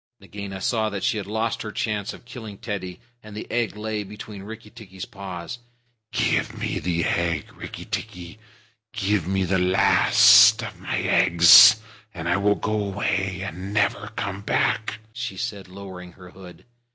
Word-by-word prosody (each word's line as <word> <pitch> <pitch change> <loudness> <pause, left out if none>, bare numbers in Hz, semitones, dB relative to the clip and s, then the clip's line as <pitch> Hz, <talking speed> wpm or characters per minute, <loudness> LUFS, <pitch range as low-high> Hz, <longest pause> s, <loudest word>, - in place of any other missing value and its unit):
Nagaina 100 0 -8
saw 110 +2 0
that 100 -2 -5
she 110 - +1
had 100 -2 -5
lost 110 +2 -2
her 110 - -6
chance 105 -2 -3
of - - -13
killing 110 -5 -9
Teddy, 95 -5 -6 0.2
and 110 -2 -11
the - - -6
egg 120 -3 -1
lay 105 0 -3
between 105 0 -10
Rikki 110 +1 -10
tikki's 95 -5 -10
paws. 95 +3 -8 0.5
"Give - - 0
me - - -3
the 85 0 -1
egg, 85 -3 -1
Rikki - - -9
tikki. 90 +3 -6 0.5
Give 100 -5 -1
me 95 0 0
the 95 +1 0
last 90 +1 +6
of - - -8
my - - -3
eggs, 85 +5 +7 0.4
and 85 -1 -5
I 90 - +2
will 100 +1 +2
go 110 -1 -2
away 95 -2 -2
and 95 +2 -6
never 105 -1 0
come 100 -1 -4
back," 110 +1 -1
she 120 -5 -5
said, 100 -5 -5
lowering 90 -2 -10
her 90 -1 -14
hood. 90 -2 -14
100 Hz, 165 wpm, -23 LUFS, 95-110 Hz, 0.5 s, eggs